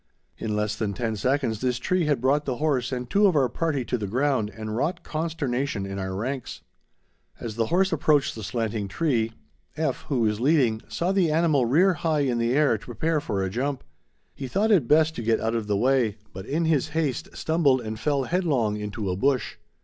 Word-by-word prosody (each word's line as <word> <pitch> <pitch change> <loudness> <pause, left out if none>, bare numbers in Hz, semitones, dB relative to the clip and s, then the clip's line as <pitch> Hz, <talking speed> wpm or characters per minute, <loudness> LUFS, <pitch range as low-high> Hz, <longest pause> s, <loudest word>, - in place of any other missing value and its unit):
In 105 -1 -2
less 105 0 -1
than 105 -2 -2
ten 115 +1 -2
seconds 125 -1 0
this 125 -1 0
tree 180 +7 0
had 145 -5 +1
brought 140 +3 +2
the 130 - -1
horse 140 -4 0
and 125 -1 -3
two 205 - +4
of 185 - +2
our 135 -3 +4
party 140 0 -2
to 125 - -2
the 105 - -3
ground 130 0 +1
and 110 0 -6
wrought 170 +8 -1
consternation 140 -8 -2
in 100 0 -5
our 95 0 -3
ranks. 125 +5 -4 0.8
As 110 -3 -5
the 115 -1 0
horse 190 +5 +2
approached 150 -2 +2
the 110 - -8
slanting 110 0 -2
tree, 115 -2 0 0.5
F., 150 -4 -2
who 135 -5 0
was 105 -1 +1
leading, 125 -5 +2
saw 175 +2 -1
the 190 -4 +2
animal 155 -5 +2
rear 180 +10 +4
high 155 -2 0
in 125 -4 0
the 115 0 +1
air 140 -6 +3
to - - -15
prepare 150 +7 -1
for 100 -6 -2
a 95 - -1
jump. 130 +4 -2 0.5
He 135 - -6
thought 205 - +1
it 165 - +4
best 155 +2 +4
to - - -3
get 115 0 +1
out 110 +1 -1
of 115 -2 -2
the 105 -1 +1
way, 120 -3 +2 0.2
but 95 +1 -8
in 165 +3 0
his 155 -5 +2
haste 145 -7 -1
stumbled 155 -5 +2
and 110 -1 -5
fell 140 +2 +1
headlong 135 - 0
into 105 0 -4
a - - -1
bush. 130 +5 0
130 Hz, 210 wpm, -25 LUFS, 110-155 Hz, 0.8 s, two